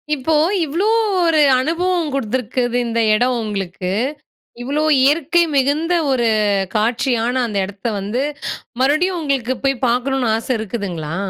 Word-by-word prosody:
இப்போ 300 +3 0 0.3
இவ்ளோ 340 +9 0 0.4
ஒரு 320 -2 +3 0.2
அனுபவம் 335 +2 0
கொடுத்துருக்குது 245 0 -1
இந்த 230 0 -1
இடம் 245 +3 +2
உங்களுக்கு, 195 -4 -4 0.7
இவ்ளோ 285 +4 -1 0.2
இயற்கை 325 +4 +3
மிகுந்த 290 +6 +1 0.2
ஒரு 240 -3 +2 0.5
காட்சியான 240 +2 0
அந்த 210 -3 -4
இடத்த 200 +3 -7
வந்து 220 +7 -2 0.6
மறுபடியும் 325 +7 +2
உங்களுக்கு 265 -4 -1
போய் 270 -2 0
பார்க்கணும்னு, 250 0 0
ஆசை 230 - -4
இருக்குதுங்களா? 185 -8 -4
255 Hz, 115 wpm, -18 LUFS, 225-295 Hz, 0.7 s, ஒரு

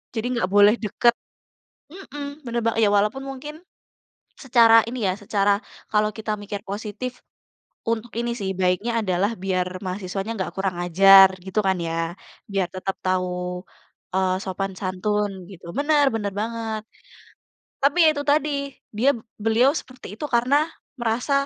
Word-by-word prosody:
Jadi 220 0 -2
nggak 185 -5 0
boleh 205 +2 +6
deket 235 +3 +2 0.8
Mhm, 290 -5 -8
bener 235 0 -1
ba 230 - +2
ya 215 - +5
walaupun 210 +6 +1
mungkin, 270 +2 -7 0.9
secara 230 -3 +7
ini 240 -2 -3
ya, 185 - +2
secara 200 0 +2 0.3
kalau 210 0 +3
kita 220 -1 -3
mikir 205 0 -6
positif, 215 +5 -6 0.7
untuk 230 0 -2
ini 235 +1 -1
sih, 195 -1 -2
baiknya 185 +6 +1
adalah 190 +1 +1
biar 185 -2 0 0.2
mahasiswanya 195 +2 -4
nggak 185 - -3
kurang 195 -2 -1
ajar, 195 +2 +8 0.2
gitu 190 +2 -3
kan 190 - +3
ya. 165 +1 -2 0.4
Biar 195 -2 +1
tetap 190 +1 -3
tahu, 185 0 +1 0.9
eee, 190 -1 +2
sopan 195 +1 -3
santun 205 +2 -1 0.2
gitu. 185 -3 -13
Benar 290 0 +3
benar 205 -2 -1
banget. 225 -1 -3 1.0
Tapi 280 +3 +3
ya - - +8
itu 285 - -3
tadi, 300 +1 +2 0.5
dia 255 +5 +3 0.4
beliau 225 +4 +4
seperti 255 0 -14
itu 225 - -7
karena, 245 +4 +3 0.4
merasa, 240 +4 -1
210 Hz, 145 wpm, -23 LUFS, 195-240 Hz, 1.0 s, ajar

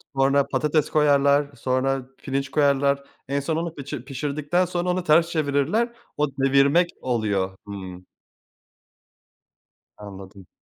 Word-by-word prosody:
Sonra 135 +1 +3
patates 150 0 0
koyarlar. 145 -1 +3
Sonra 130 +2 0 0.2
pirinç 135 0 -3
koyarlar. 140 -1 +2 0.2
En 140 +1 0
son 155 +3 -2
onu 165 0 -3
pişi 140 -2 -7
pişirdikten 145 +6 -1
sonra 175 0 -2
onu 180 0 0
ters 165 +1 +4
çevirirler. 155 - 0 0.2
O 150 0 +2
devirmek 140 +6 +3
oluyor. 100 -6 -1
Hımm. 95 -2 -8 1.9
Anladım. 95 -2 -11
140 Hz, 115 wpm, -24 LUFS, 130-155 Hz, 1.9 s, ters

